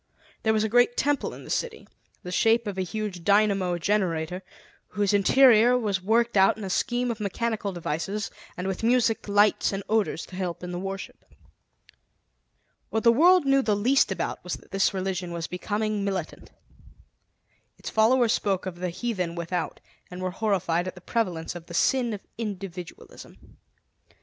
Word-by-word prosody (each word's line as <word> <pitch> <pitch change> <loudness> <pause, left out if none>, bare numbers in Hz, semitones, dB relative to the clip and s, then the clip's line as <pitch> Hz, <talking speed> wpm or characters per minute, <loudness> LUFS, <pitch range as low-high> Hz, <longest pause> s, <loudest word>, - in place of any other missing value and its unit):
There 220 - +2
was 215 -1 +2
a - - +1
great 245 +2 +3
temple 290 0 0
in - - -11
the - - -8
city, 480 -2 -3 0.4
the 180 - -6
shape 225 +5 +3
of 205 -2 -4
a 190 - -2
huge 195 -2 -4
dynamo 200 -3 +2
generator, 180 -2 -1 0.5
whose 205 0 +1
interior 240 +3 +5
was 205 -5 -1
worked 230 +4 +1
out 195 +1 +5
in 215 - -7
a 190 - -4
scheme 245 +4 0
of 225 - -6
mechanical 210 0 -2
devices, 175 +4 -3 0.3
and 180 - -4
with 190 -1 -3
music, 230 -1 +2
lights, 205 +1 +3
and 195 0 -4
odors 215 -6 0
to 185 - -12
help 180 -2 -4
in 180 - -5
the 175 - -4
worship. 195 +1 -6 1.7
What 220 - -1
the 235 - +7
world 345 +6 +5
knew 275 0 +4
the 215 -5 +1
least 250 +7 +3
about - - -3
was - - -3
that - - -17
this 195 0 +2
religion 185 -2 -3
was 170 -1 -4
becoming 210 +3 -2
militant. 190 -5 -4 1.3
Its - - -7
followers 230 +1 +4
spoke 195 -2 -1
of 185 -2 -5
the 180 0 -3
heathen 180 -3 -3
without, 170 0 -3 0.3
and 180 - -8
were 185 0 -2
horrified 180 -4 0
at 185 - -6
the 180 - -12
prevalence 180 -6 -2
of 175 -1 -10
the 170 - -7
sin 245 +4 +2
of 200 - -8
individualism. 195 -5 -7
200 Hz, 170 wpm, -26 LUFS, 180-225 Hz, 1.7 s, the